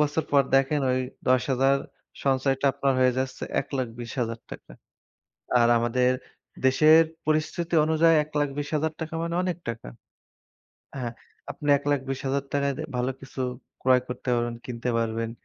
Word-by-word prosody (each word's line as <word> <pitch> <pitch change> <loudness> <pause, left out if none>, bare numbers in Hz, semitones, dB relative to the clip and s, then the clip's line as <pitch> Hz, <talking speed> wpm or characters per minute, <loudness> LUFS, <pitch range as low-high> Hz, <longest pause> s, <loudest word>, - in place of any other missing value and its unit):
বছর 150 +1 +1
পর 140 -1 +6
দেখেন 135 +2 +3
ওই 130 - +1 0.3
১০,০০০ 130 +1 +3 0.5
সঞ্চয়টা 135 0 +1
আপনার 135 0 +1
হয়ে 125 -1 +4
যাচ্ছে 130 -1 -3 0.2
৳১,২০,০০০ 120 -3 -5 0.9
আর 120 - +5
আমাদের 125 +2 +2 0.5
দেশের 155 +5 +6 0.2
পরিস্থিতি 160 +2 -1
অনুযায়ী 160 +1 +4
৳১,২০,০০০ 150 +2 -2
মানে 170 0 -2
অনেক 180 -3 -2
টাকা। 115 - -6 1.1
হ্যাঁ, 120 -3 -3 0.4
আপনি 145 - -5
৳১,২০,০০০-য় 140 0 -1 0.2
ভালো 125 +2 0
কিছু 135 0 -9 0.4
ক্রয় 130 0 +5
করতে 125 +1 -6
পারবেন, 120 0 -1
কিনতে 120 0 -4
পারবেন। 115 0 -1
135 Hz, 115 wpm, -26 LUFS, 125-150 Hz, 1.1 s, পর